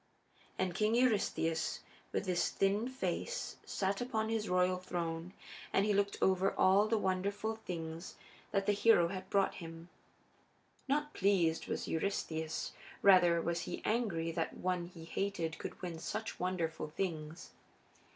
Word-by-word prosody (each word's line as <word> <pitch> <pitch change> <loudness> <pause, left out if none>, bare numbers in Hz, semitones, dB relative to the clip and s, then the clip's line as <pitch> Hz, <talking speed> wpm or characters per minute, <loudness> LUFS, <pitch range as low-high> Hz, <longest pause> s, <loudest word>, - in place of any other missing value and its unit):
And 185 -1 0
King 215 +4 +2
Eurystheus, 205 -9 +1 0.3
with - - -1
his 175 -1 +1
thin 200 +3 +1
white - - -6
face, 385 - -3
sat 195 +2 -1
upon 220 -3 -1
his 225 -1 -1
royal 180 0 +3
throne 175 -1 -3 0.4
and 200 - +3
he 210 - +2
looked 200 0 +1
over 190 +1 +3
all 195 +3 +5
the 225 +1 +2
wonderful 200 +3 -1
things 165 -4 -6 0.3
that 195 -1 0
the 205 - +4
hero 205 -4 +5
had 190 0 -6
brought 195 -1 +3
him. 165 +1 -9 1.0
Not 295 +2 0
pleased 180 -5 +2
was - - -3
Eurystheus; 160 -2 -2 0.3
rather 180 -3 +7
was 170 0 0
he - - -5
angry 195 -8 0
that 165 0 -2
one 180 -1 -1
he 170 -2 -11
hated 165 -3 -2
could - - -6
win 170 -2 -4
such 215 +6 -4
wonderful 175 -4 -1
things. 160 -1 -4
185 Hz, 145 wpm, -34 LUFS, 170-205 Hz, 1.0 s, rather